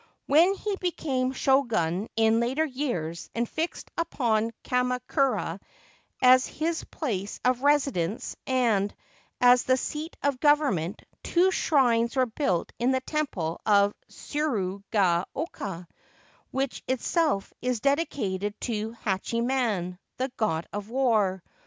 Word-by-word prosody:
When 335 +7 +5
he 410 0 -2
became 270 -8 -1
Shogun 230 -9 +1
in 225 0 +4
later 260 +7 +1
years, 240 - -3
and 235 +1 0
fixed 325 +7 -4
upon 230 -9 +1
Kamakura 250 +2 0 0.6
as 255 0 +7
his 325 +1 -2
place 205 - -4
of 250 0 +2
residence 270 - +1
and 225 -6 +1 0.4
as 245 0 +6
the 255 0 +3
seat 305 +5 -5
of 280 -2 +1
government, 275 - +2 0.2
two 360 +2 +3
shrines 240 -8 +2
were 260 -1 +3
built 225 - -1
in 240 +2 +2
the 260 0 +1
temple 255 - -2
of 205 -1 +4 0.2
Tsuru 210 -11 -2
ga 185 -5 +2
oka, 195 - -5 0.6
which 270 0 -2
itself 260 - 0
is 250 -2 0
dedicated 215 - -1
to 225 -1 -2
Hachiman, 215 -3 -1 0.2
the 260 +1 -2
God 170 -7 0
of 205 +1 -5
War. 220 -8 +1
250 Hz, 120 wpm, -27 LUFS, 205-275 Hz, 0.6 s, as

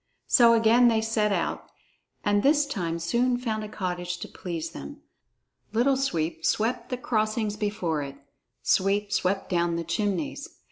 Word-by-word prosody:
So 235 -1 +6
again 230 +2 +5
they 225 -2 +3
set 220 -1 +1
out, - - -2 0.6
and 205 0 +3
this 290 +3 +4
time 175 -12 -3
soon 235 +9 +1
found 220 -3 -3
a 210 - -6
cottage 180 -3 -3
to - - -5
please 170 -2 -5
them. 70 +1 -9 0.7
Little 250 +5 +3
Sweep 165 -12 -1
swept 225 +7 0
the 250 - -2
crossings 215 -3 -1
before 205 -8 -1
it; 140 -1 -6 0.5
Sweep 200 +2 +2
swept 195 +1 0
down 170 -1 +1
the 170 - -2
chimneys. 175 -1 -2
205 Hz, 150 wpm, -26 LUFS, 175-230 Hz, 0.7 s, So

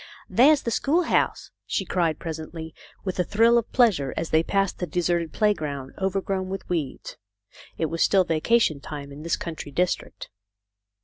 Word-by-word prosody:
"There's 285 +4 +5
the 235 - -2
schoolhouse," 325 +9 +1 0.2
she - - -1
cried, 165 -4 0
presently, 160 0 -6 0.3
with 185 -2 -4
a - - +4
thrill 230 +5 +4
of 230 - -7
pleasure 205 - +3
as 165 - -3
they 160 - +5
passed 195 +2 0
the 180 - -2
deserted 170 -2 0
playground, 150 -11 -1
overgrown 190 0 -1
with 195 0 -5
weeds. 160 -7 -4 0.6
It 165 - 0
was 165 +1 -3
still 195 -2 +5
vacation 165 0 +2
time 145 -1 -8
in 140 +2 -9
this 165 +1 0
country 160 -3 -6
district. 180 +5 -2
175 Hz, 160 wpm, -25 LUFS, 160-200 Hz, 0.6 s, There's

